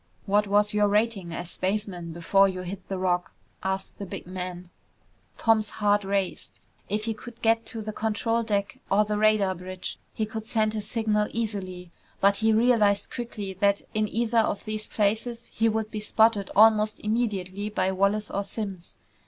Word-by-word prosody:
"What 205 +1 +2
was 205 +1 +3
your 210 0 +3
rating 205 -4 +1
as 175 +1 -4
spaceman 185 -3 -2
before 195 +4 +3
you 185 -1 -4
hit 185 +1 -7
the 195 - -3
Rock?" 180 0 0 0.3
asked 190 0 -3
the 200 - -4
big - - -7
man. 180 -1 -6 0.7
Tom's 220 -2 +3
heart 205 -1 +2
raced. 195 -1 -2 0.3
If 210 +2 -1
he 225 - 0
could 230 +2 -11
get 225 0 +3
to 225 -2 -5
the 215 0 -5
control 225 +2 0
deck 210 +2 -2
or 210 +2 +4
the 210 0 -1
radar 215 -3 +3
bridge, 185 +1 -6
he 220 - -2
could 220 0 -6
send 220 -2 +1
his 210 -1 -4
signal 215 -2 +1
easily. 185 -6 -4 0.3
But 200 0 +4
he 220 0 +3
realized 220 -3 +3
quickly 215 -5 -5
that 200 0 +3
in 215 0 +1
either 230 +1 +1
of 215 -2 0
these 215 0 -3
places 230 +3 -1
he 225 0 +2
would 220 0 -2
be 215 - -3
spotted 215 -1 +3
almost 215 0 +5
immediately 210 -3 -1
by 190 -3 0
Wallace 200 +2 +1
or 200 - -1
Simms. 195 -3 -6
210 Hz, 175 wpm, -26 LUFS, 195-220 Hz, 0.7 s, almost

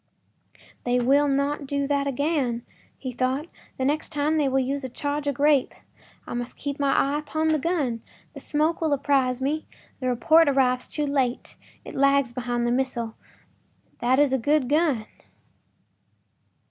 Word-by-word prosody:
“They 245 0 +1
will 275 +4 +3
not 280 +1 0
do 280 0 -1
that 280 0 0
again,” 275 -4 -1 0.3
he 260 - -5
thought; 255 +4 -1 0.3
“the 260 - -1
next 295 +3 0
time 295 +2 0
they 290 -3 +2
will 265 - +1
use 270 +2 -1
a 260 - -4
charge 285 +3 -3
of 285 - 0
grape. 285 -1 +2 0.5
I - - -6
must 245 +1 -4
keep 285 0 -4
my 280 -1 +2
eye 285 +2 +2
upon 315 +1 -1
the 310 -1 +2
gun; 275 -8 -1 0.3
the - - -9
smoke 310 +3 0
will 315 -3 +2
apprise 265 -2 +1
me—the 285 -2 -5
report 310 +6 +4
arrives 255 -2 +1
too 300 - -2
late; 270 -4 -1 0.3
it - - -8
lags 275 -2 +3
behind 240 -1 -2
the 240 - +1
missile. 240 -3 -1 0.8
That 250 +2 +2
is 285 -2 +3
a 265 - +2
good 290 +2 +2
gun. 290 -6 +1
275 Hz, 160 wpm, -25 LUFS, 255-290 Hz, 0.8 s, report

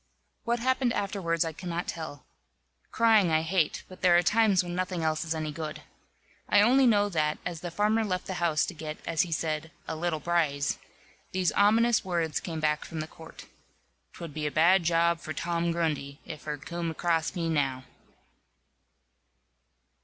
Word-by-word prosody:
What 235 +1 +1
happened 255 0 +1
afterwards 185 -6 -1
I 165 - -4
cannot 175 +1 -4
tell. 155 -4 -6 0.7
Crying 220 -5 +4
I 160 0 +2
hate, 165 -1 0
but 185 - -13
there 175 -1 +6
are 175 - +3
times 210 -2 +3
when 175 0 -5
nothing 180 -1 -2
else 155 0 0
is 165 -1 -2
any 155 -1 -3
good. 150 0 -6 0.7
I 205 - +5
only 260 +4 +5
know 205 -3 +4
that, 155 -4 0
as 170 -3 -4
the 175 - -4
farmer 210 +5 +1
left 185 -4 -2
the 190 - -4
house 160 -3 +2
to - - -6
get, 155 -1 -6
as 165 -2 +1
he 175 - -2
said, 160 0 -2 0.2
"a 160 - -3
little 160 -1 -1
braze," 150 -3 0 0.5
these 185 -3 +1
ominous 225 +3 +4
words 170 -4 -1
came 165 -3 -5
back 150 -1 0
from 165 - -7
the 155 - -2
court: 160 0 -13 0.7
"'Twud 165 -4 -8
be 150 0 -2
a - - -3
bad 175 +5 +5
job 170 0 +2
for 155 -2 -6
Tom 170 0 -1
Grundy, 150 -4 -2
if 155 -3 -9
her 150 -1 -3
coom'd 165 +2 -4
acrass 165 -2 0
me 170 -2 -1
now." 135 -5 0
170 Hz, 175 wpm, -28 LUFS, 155-185 Hz, 0.7 s, there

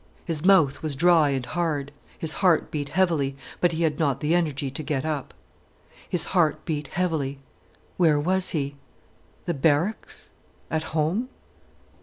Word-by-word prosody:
His 165 -3 -3
mouth 175 -8 +4
was 155 -3 -3
dry 165 0 +4
and 135 -3 -1
hard, 155 -4 -2 0.3
his 160 -1 -1
heart 180 -4 +3
beat 145 -2 -3
heavily, 155 -6 +1 0.2
but 175 - +3
he 165 +1 -1
had 155 -3 0
not 140 -5 +1
the 150 +2 0
energy 150 -6 0
to 145 - -5
get 150 -2 -2
up. 150 -4 -3 0.8
His 180 - +2
heart 155 -4 +2
beat 150 -3 -3
heavily. 160 -6 -1 0.6
Where 160 -5 +4
was 185 +4 +1
he?—the 140 +3 -6
barracks—at 160 +1 -2
home? 180 +12 0
155 Hz, 140 wpm, -25 LUFS, 145-175 Hz, 0.8 s, mouth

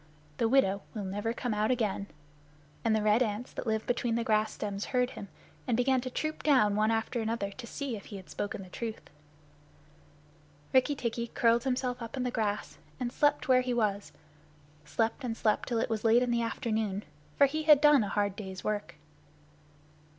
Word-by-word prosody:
"The 225 - +2
widow 200 -7 +3
will 210 - -3
never 205 +4 -2
come 235 0 -2
out 210 +1 +1
again." 215 -5 0 0.8
And 225 -1 +3
the 215 - +1
red 215 +3 +4
ants 220 0 -2
that - - -5
live 220 0 0
between 240 -1 0
the 235 - 0
grass 215 -2 +2
stems 200 -1 -4
heard 250 -1 0
him, 200 - -8 0.4
and 235 -3 +1
began 260 +1 +2
to 255 - -4
troop 310 +4 -3
down 255 -9 +4
one 215 +1 +2
after 225 +1 0
another 220 -3 -2
to 235 +4 -9
see 275 -2 -4
if 200 - -9
he 205 - -9
had 190 - -12
spoken 205 -1 -4
the 185 - -13
truth. 225 +3 -6 1.6
Rikki 265 +3 +4
tikki 235 -2 -2
curled 235 +1 +2
himself 250 -1 -1
up 230 +3 -6
in 255 - -1
the 250 - -1
grass 215 -3 -2 0.2
and 245 -2 -2
slept 290 0 +2
where 255 -1 +5
he 250 -1 -1
was 205 -3 0 0.7
slept 225 - -1
and 230 -2 -3
slept 215 -2 +1
till 235 - 0
it 225 - +1
was 215 -1 -1
late 230 +2 +5
in 245 - 0
the 235 0 +2
afternoon, 220 -3 -2 0.3
for 280 - +7
he 310 +3 -1
had 300 -2 +7
done 295 -4 +6
a 200 - -3
hard 205 -1 0
day's 190 -2 -7
work. 205 -6 -3
230 Hz, 195 wpm, -30 LUFS, 210-250 Hz, 1.6 s, for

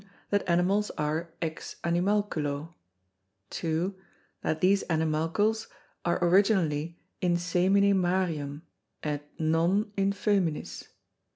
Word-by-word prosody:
That 205 -2 +1
Animals 185 +5 +2
are 155 +3 -1
ex 160 -1 -5
Animalculo. 170 -4 0 0.8
2. 165 +3 -1 0.5
That 155 - -1
these 195 +3 +3
Animalcles 165 +7 0 0.4
are 170 - +1
originally 170 -4 +2 0.2
in 175 -2 +2
semine 185 +3 +3
Marium 175 -6 0 0.4
& 145 -1 -4
non 170 +7 +2
in 195 0 +2
Fœminis. 195 -5 -1
3. - - -24
175 Hz, 100 wpm, -28 LUFS, 160-195 Hz, 0.8 s, these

